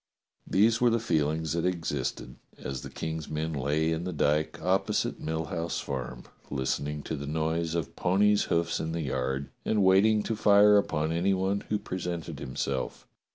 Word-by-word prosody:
These 110 +4 +3
were 120 - +5
the 115 0 +2
feelings 80 -6 0
that 85 0 -1
existed 75 -8 -2 0.2
as 65 -2 -5
the - - -8
King's 80 -1 -5
men 80 +1 -2
lay 75 +3 0
in 80 +1 -1
the 90 - -3
dyke 75 -1 0
opposite - - 0
Mill 80 0 -2
House 85 +2 -3
Farm, 65 -2 -5 0.3
listen 65 +1 -1
ing 75 0 -4
to 80 - -3
the 70 -1 -6
noise 80 +2 -1
of 85 -5 -3
ponies' 100 +3 +3
hoofs 85 0 0
in 80 0 -3
the 85 - -2
yard, 65 -1 -2
and 105 -2 +2
waiting 105 +3 +5
to 115 - -2
fire 105 -1 +6
upon 80 -5 -1
any 90 +4 +2
one 95 +2 0
who 105 - +2
presented 90 -5 -5
himself. 65 0 -3
80 Hz, 175 wpm, -28 LUFS, 75-95 Hz, 0.3 s, fire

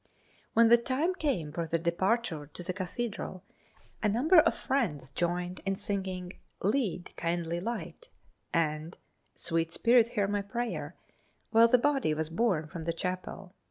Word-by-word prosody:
When 230 0 +6
the 235 0 +7
time 275 +9 0
came 255 - -1
for 165 +1 -3
the 165 - +1
departure 170 -1 0
to 170 +4 -8
the 185 - -2
Cathedral 185 0 -4 0.6
a 215 - +2
number 300 - +5
of 315 - +5
the - - +1
friends 165 - 0
joined 175 +1 -2
in 195 0 0
singing 190 -2 -3 0.3
"Lead, 200 -4 0
Kindly 170 0 -1
Light" 235 - -5 0.4
and 155 0 -1 0.4
"Sweet 165 -1 -1
Spirit 235 +4 +4
Hear 200 -1 +3
My 205 0 0
Prayer" 235 +4 -4 0.6
while 230 +1 +7
the 250 - +5
body 270 - +1
was 160 +1 -2
borne 180 -4 +1
from 160 +2 -7
the 165 - 0
chapel. 185 +1 -5
185 Hz, 155 wpm, -30 LUFS, 170-235 Hz, 0.6 s, the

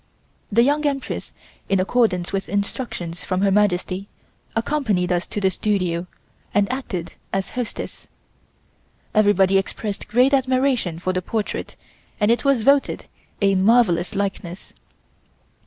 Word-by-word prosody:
The 230 +3 +5
Young 290 +3 +2
Empress 275 -2 -3 0.4
in 195 - +3
accordance 190 -3 +1
with 195 0 -2
instructions 200 -4 -3
from 185 0 -1
Her 200 -1 +3
Majesty, 195 -1 +1 0.5
accompanied 225 -8 0
us 175 0 0
to - - -3
the 190 -1 +2
studio, 180 -4 -1 0.5
and 205 -1 +4
acted 190 -10 -4 0.2
as 195 0 -1
hostess. 245 -2 -5 1.1
Everybody 195 -3 +4
expressed 200 +1 -4
great 250 +5 +3
admiration 260 -8 +2
for 185 +2 -2
the 185 - -1
portrait 215 +3 -3 0.4
and 210 +1 +4
it 235 - +1
was 275 -5 +3
voted 280 +2 +3 0.4
a 195 0 +4
marvellous 195 -2 +3
likeness. 195 -2 -4
200 Hz, 125 wpm, -22 LUFS, 185-240 Hz, 1.1 s, The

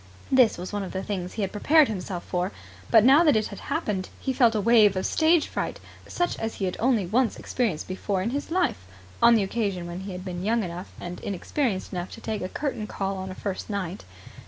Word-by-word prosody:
This 255 -4 +5
was 180 +3 -6
one 205 - -1
of 190 - -6
the 190 0 -3
things 185 -3 -4
he 215 - -2
had 190 - -2
prepared 300 +8 +5
himself 185 -3 -4
for, 180 +2 -2 0.4
but, 225 -2 +7
now 275 +7 +7
that 300 -7 +5
it 215 -1 +1
had 200 - -8
happened, 210 - -2
he 265 - -2
felt 235 -3 +4
a - - +2
wave 215 -2 +5
of 185 - -1
stage 320 0 +3
fright - - -4 0.3
such 350 0 -1
as 225 0 -3
he 195 - -2
had 180 - -2
only 230 -4 +2
once 230 +6 +1
experienced 220 -11 -2
before 185 0 -2
in 230 - -1
his 285 +2 -3
life 330 - 0 0.3
on 235 - +7
the 215 - +3
occasion 195 -3 -2
when 175 +1 -6
he 190 +1 -6
had 180 +1 -7
been 180 -1 -4
young 225 +2 +1
enough 175 +1 -6
and 175 0 -6
inexperienced 200 - -2
enough 180 0 -3
to - - -9
take 215 -2 -3
a 185 - -3
curtain 265 -6 -3
call 195 -1 -3
on 190 0 -5
a 185 - -7
first 195 +1 -4
night. 195 -3 -4
205 Hz, 230 wpm, -26 LUFS, 185-235 Hz, 0.4 s, but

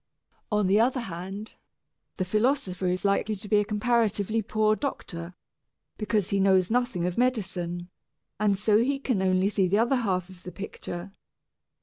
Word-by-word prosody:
On 210 -1 +2
the 195 +3 +4
other 250 +3 +2
hand, 195 +2 -6 0.6
the 185 - -1
philosopher 215 -2 0
is 180 +1 -1
likely 200 +2 +1
to 205 +1 -8
be 210 0 +4
a - - +2
comparatively 220 0 +1
poor 215 +1 +2
doctor, 180 -10 -5 0.6
because 210 -3 0
he 200 - +2
knows 190 0 +3
nothing 245 -7 +1
of 180 +4 -1
medicine, 180 -8 -1 0.5
and 205 -2 +2
so 210 +1 +3 0.2
can 250 -7 0
see - - 0
only 185 0 +3
the 195 -1 +2
other 240 +4 +3
half 185 -7 0
of 185 -1 -14
the 180 - -8
picture. 195 -2 -7
200 Hz, 155 wpm, -27 LUFS, 185-220 Hz, 0.6 s, the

